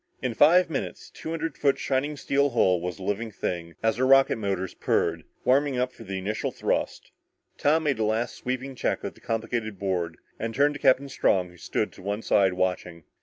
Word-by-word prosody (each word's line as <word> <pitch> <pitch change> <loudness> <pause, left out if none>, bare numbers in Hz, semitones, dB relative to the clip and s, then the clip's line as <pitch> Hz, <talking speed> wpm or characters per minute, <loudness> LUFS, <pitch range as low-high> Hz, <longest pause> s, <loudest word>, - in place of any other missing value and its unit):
In 125 -2 -2
five 170 +9 +6
minutes 150 -5 -5
the - - -19
two - - -6
hundred 165 0 -3
foot 140 -2 +3
shining 140 +2 -1
steel 140 +1 +1
hull 95 -8 +3
was 90 0 -4
a 95 - -9
living 105 +4 -2
thing 85 -4 -4
as 110 +1 +2
her 130 +1 +2
rocket 135 -2 +5
motors 95 -4 -2
purred, - - 0 0.2
warming 135 +1 +3
up 125 0 0
for - - -12
the 95 -2 -4
initial 100 +3 -2
thrust. - - -2 0.5
Tom 155 +2 +3
made 140 -6 0
a - - +2
last 110 +2 0
sweeping 130 +2 -4
check 125 - -1
of - - -4
the - - -21
complicated 115 -2 -2
board 90 -4 -2 0.2
and 115 0 -3
turned 145 +2 +3
to 145 - -7
Captain 135 0 +4
Strong 95 -8 +1
who 90 - -17
stood - - -2
to - - -14
one 100 +3 -3
side 95 -2 +3
watching. 90 -2 -2
115 Hz, 210 wpm, -26 LUFS, 95-135 Hz, 0.5 s, five